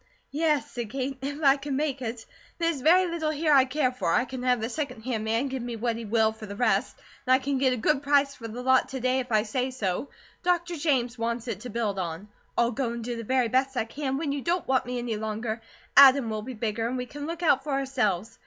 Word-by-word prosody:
"Yes," 300 0 +1
said 240 -3 -5
Kate, 265 +2 -3
"if 285 +3 -4
I 275 0 +6
can 280 0 -4
make 280 -2 -1
it. 230 -1 -5 0.3
There's 330 -5 0
very 355 +6 +5
little 335 -3 -2
here 305 0 +2
I 270 -2 +6
care 260 -1 0
for; 190 -10 -1
I 250 - +3
can 260 0 -6
have 250 -1 +2
the 220 - -2
second 255 -3 -4
hand 230 -3 -2
man 225 +5 0
give 265 -1 -4
me 240 0 -4
what 230 +1 -1
he 230 0 -6
will 220 0 +2
for 220 -1 -10
the 200 - -7
rest; 220 -1 +1 0.3
and 255 - +6
I - - +4
can 275 0 -1
get 260 -1 +3
a 250 - 0
good 270 +4 +1
price 285 -1 +3
for 230 -4 -8
the 240 +3 -7
lot 260 0 +3
to 265 - -4
day, 255 +1 +1
if 250 -1 -5
I 215 -1 +3
say 250 +4 -1
so. 225 -1 -2 0.3
Dr. 350 -1 0
James 260 -6 0
wants 235 +1 -2
it 215 -5 -3
to 245 +3 -8
build 210 -4 -2
on. 175 +3 -5 0.3
I'll 235 0 +3
go 245 -1 -2
and 235 -1 -5
do 240 +1 -3
the 230 - -5
very 255 +1 +2
best 265 +2 +1
I 220 - +1
can, 280 +5 -5
and 265 +1 0
when 295 -1 -2
you 280 0 -2
don't 345 +4 -1
want 260 -2 +1
me 250 0 -3
any 240 -3 -2
longer, 220 +1 -3 0.3
Adam 270 -3 +8
will 215 0 -2
be 250 +3 -7
bigger 225 +1 -2
and 255 +2 -2
we 250 - -3
can 290 +3 -7
look 340 +1 -5
out 295 -5 +3
for 305 - -7
ourselves. 235 -7 -1
255 Hz, 265 wpm, -27 LUFS, 230-280 Hz, 0.3 s, Adam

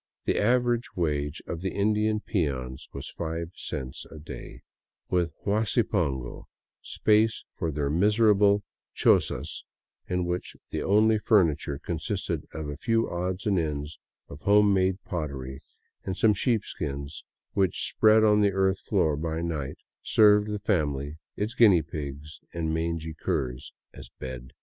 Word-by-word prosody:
The - - +1
average 120 +1 +1
wage 75 -3 -1
of 85 - -5
the 95 - -3
Indian 105 +1 +1
peons 65 - -2
was - - -7
five 85 0 -4
cents 65 0 -5
a 80 - -11
day, 75 +1 -9 0.5
with 85 -2 +1
huasi 110 +3 +2
pongo,— 70 - -2 0.3
space 110 +1 +2
for 80 - -2
their 70 -1 -1
miserable 105 +2 +4 0.3
chozas - - +2 0.5
in 90 -1 -1
which 90 +1 -3 0.2
the - - -2
only 110 +2 +4
furniture 80 - +2
consisted 80 +2 -3
of 80 -2 -5
a 70 -1 -5
few 115 +3 +1
odds 90 +2 -3
and 100 -4 +2
ends 75 -1 -3 0.3
of 70 - -11
home 105 +1 +5
made 95 0 +2
pottery 70 - -5 0.4
and 95 0 -4
some 110 -2 +4
sheepskins 80 - -2 0.3
which, 95 -4 +1
spread 110 0 +5
on 105 -1 +5
the 100 -1 +3
earth 95 0 +2
floor 85 -8 +1
by 80 +2 -3
night, 75 -5 -3 0.2
served 105 -1 +5
the 105 0 -2
family, 75 -7 -1 0.2
its 105 +3 -2
guinea 105 -9 +6
pigs 75 -1 -7 0.2
and 80 -1 -1
mangy 80 0 -2
curs, 65 -3 -3 0.2
as - - -11
bed. 65 -1 -7
85 Hz, 140 wpm, -27 LUFS, 75-105 Hz, 0.5 s, guinea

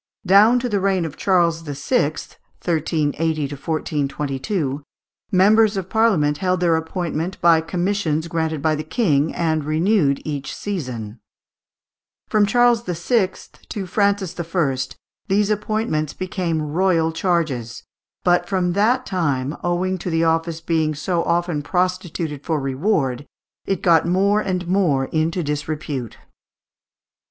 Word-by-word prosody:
Down 205 +6 +6
to 245 0 -1
the 205 -4 0
reign 190 -3 +1
of 160 - -6
Charles 170 -4 +2
VI. 145 - 0
(1380 155 0 -2
1422) 145 0 -2 0.5
members 210 +3 +4
of 190 -1 -5
Parliament 180 -11 +2
held 185 -1 +1
their 170 -2 +3
appointment 165 +1 -3
by 165 -2 +5
commissions 170 -2 -1
granted 160 -3 -2
by 155 -1 +3
the 155 0 -3
King, 155 - +1
and 160 -2 0
renewed 155 -1 +2
eaeh 145 -3 -4
session. 125 - -5 1.1
From 210 -1 +3
Charles 240 +1 +4
VI. 185 +3 +1 0.4
to 200 -3 -4
Francis 200 -2 0
I. 165 -5 0 0.5
these 205 +1 +2
appointments 210 -8 -1
became 180 -4 -2
royal 165 +1 +1
charges; 155 -10 -1 0.4
but 175 0 +2
from 180 -3 +1
that 235 +6 +2
time, 145 -6 -1
owing 180 +2 0
to 180 - -4
the 165 0 +1
office 165 0 0
being 160 -2 0
so 170 +3 -1
often 170 -3 0
prostituted 175 -3 -2
for 160 -3 -1
reward, 135 - -1 0.4
it 195 -3 -1
got 170 -3 +4
more 200 +4 +2
and 180 -3 -2
more 170 -8 +2
into 165 +4 -1
disrepute. 145 -4 -4
170 Hz, 125 wpm, -21 LUFS, 155-190 Hz, 1.1 s, Down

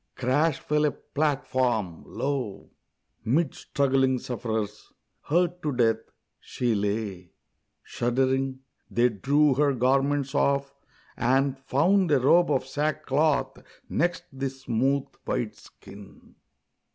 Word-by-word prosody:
crash 140 +4 +1
fell 150 0 0
a - - +4
platform! 130 - -1
Lo, 135 -8 -4 0.5
Mid 135 +6 +1
struggling 135 -2 +1
sufferers, 110 -4 -4 0.4
hurt 175 +3 +1
to 150 - -1
death, 115 -3 +1 0.3
she 120 -2 -2
lay! 100 -4 -3 0.5
Shuddering, 130 +2 0 0.3
they 120 +1 +3
drew 140 +7 +2
her 140 +1 +2
garments 135 +2 +1
off 140 0 +1 0.4
and 135 +2 +2
found 165 +8 +2
A 145 - +5
robe 170 +7 +4
of 135 -3 +1
sackcloth 150 +1 0 0.3
next 175 +1 0
the 135 0 -2
smooth, 135 +1 0 0.2
white - - -2
skin. 100 0 -15
135 Hz, 105 wpm, -26 LUFS, 120-145 Hz, 0.5 s, A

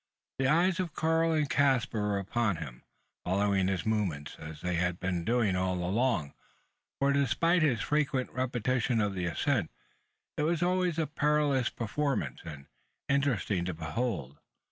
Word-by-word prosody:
The 135 - +2
eyes 175 +5 +3
of 175 -4 -3
Karl 165 +1 +2
and 155 -2 +1
Caspar 135 -6 +2
were 105 -1 0
upon 105 +1 0
him, 65 -6 -8 0.4
following 95 0 +1
his 95 -2 -1
movements, 95 -10 -1
as 75 0 -9
they 90 0 -1
had 90 +1 0
been 90 -2 -2
doing 115 -3 +1
all 90 0 0
along; 90 - 0 0.6
for, 140 0 +2
despite 155 +6 +2
his 130 -8 +2
frequent 145 -3 0
repetition 125 -1 0
of 105 -2 0
the 90 -2 -2
ascent, 85 - 0 0.7
it - - 0
was 165 +2 +1
always 180 -2 +1
a 160 - +1
perilous 150 -4 +1
performance, 120 - -2
and 70 -3 -9 0.4
interesting 125 -10 +1
to 90 -2 -3
behold. 80 - -3
115 Hz, 150 wpm, -30 LUFS, 90-145 Hz, 0.7 s, eyes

